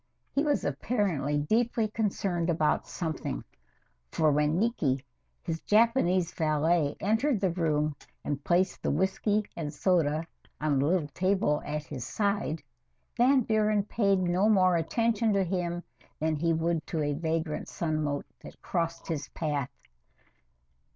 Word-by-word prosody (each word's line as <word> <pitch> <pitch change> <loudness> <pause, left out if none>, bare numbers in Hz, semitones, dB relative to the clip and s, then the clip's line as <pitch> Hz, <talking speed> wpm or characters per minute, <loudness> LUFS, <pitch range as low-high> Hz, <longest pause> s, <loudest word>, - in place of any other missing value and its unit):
He 280 - +2
was 290 -2 +1
apparently 180 - 0
deeply 225 +8 +1
concerned 195 -5 -1
about 155 -2 +1
something, 155 - -4 0.7
for 155 -1 +3
when 150 +3 +2
Niki, 155 - 0 0.4
his 165 -2 -3
Japanese 195 -6 +3
valet, 155 -1 +1
entered 225 +5 +1
the 190 -3 +1
room 155 -3 0 0.3
and 145 -1 -3
placed 180 +1 +1
the - - -1
whisky 190 +6 +1
and 155 -3 -4
soda 160 -1 +1 0.3
on 150 -3 +1
the 140 - +2
little 170 -3 +1
table 185 -1 +1
at 150 0 -2
his 130 -3 -6
side, 200 - -1 0.5
Van 260 +2 +4
Buren 215 -2 +2
paid 200 -1 +2
no 185 +3 +2
more 185 -4 +4
attention 225 +6 +1
to 195 -1 +3
him 175 -1 -2 0.4
than 155 0 +1
he 165 +3 +1
would 165 0 0
to 160 -3 -1
a 145 0 0
vagrant 160 0 -2
sunmote 155 -3 -2 0.2
that - - -12
crossed 165 -2 -2
his 155 -4 -3
path. 145 -4 -1
170 Hz, 135 wpm, -29 LUFS, 150-200 Hz, 0.7 s, Van